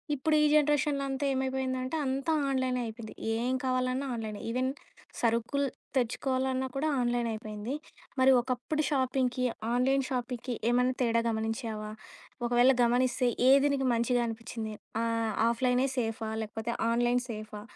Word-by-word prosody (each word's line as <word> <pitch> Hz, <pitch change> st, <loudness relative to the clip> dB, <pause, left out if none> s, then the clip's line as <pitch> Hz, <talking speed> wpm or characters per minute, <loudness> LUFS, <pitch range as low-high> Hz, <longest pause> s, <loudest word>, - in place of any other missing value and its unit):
ఇప్పుడు 305 Hz, +3 st, +1 dB
ఈ -, -, +5 dB
జనరేషన్‌లో 295 Hz, -1 st, +3 dB
అంతా 270 Hz, +1 st, -2 dB
ఏమైపోయిందంటే 260 Hz, +1 st, -1 dB
అంతా 270 Hz, +4 st, -1 dB, 0.2 s
ఆన్‌లైనే 260 Hz, -2 st, 0 dB
అయిపోయింది. 220 Hz, 0 st, -8 dB, 0.3 s
ఏం 255 Hz, +1 st, 0 dB
కావాలన్నా 255 Hz, +1 st, 0 dB
ఆన్‌లైనే. 215 Hz, -2 st, -5 dB
ఈవెన్ 255 Hz, +2 st, 0 dB, 0.5 s
సరుకులు 235 Hz, +4 st, +1 dB, 0.3 s
తెచ్చుకోవాలన్నా 260 Hz, +1 st, 0 dB
కూడా 295 Hz, +3 st, 0 dB
ఆన్‌లైన్ 240 Hz, -1 st, +1 dB
అయిపోయింది. 215 Hz, +3 st, -5 dB, 0.5 s
మరి 265 Hz, +1 st, +7 dB
ఒకప్పుడు 255 Hz, +5 st, -2 dB
షాపింగ్‌కి, 260 Hz, -2 st, +1 dB, 0.3 s
ఆన్‌లైన్ 265 Hz, +2 st, +2 dB
షాపింగ్‌కి 250 Hz, -1 st, -3 dB, 0.2 s
ఏమన్నా 250 Hz, +1 st, +2 dB
తేడా 230 Hz, -1 st, +2 dB
గమనించావా? 220 Hz, -1 st, -3 dB, 0.6 s
ఒకవేళ 245 Hz, +2 st, +5 dB
గమనిస్తే, 245 Hz, +1 st, +2 dB, 0.2 s
ఏది 275 Hz, +1 st, +6 dB
నీకు 270 Hz, -1 st, 0 dB
మంచిగా 235 Hz, +1 st, +2 dB
అనిపిచ్చింది? 225 Hz, -1 st, -5 dB, 0.3 s
ఆహ్, 230 Hz, -1 st, 0 dB
ఆఫ్‌లైనే 250 Hz, +2 st, +2 dB
సేఫా? 225 Hz, -2 st, -2 dB
లేకపోతే, 220 Hz, +2 st, -4 dB, 0.2 s
ఆన్‌లైన్ 240 Hz, +1 st, +2 dB
సేఫా? 215 Hz, -1 st, -7 dB
250 Hz, 125 wpm, -30 LUFS, 230-265 Hz, 0.6 s, మరి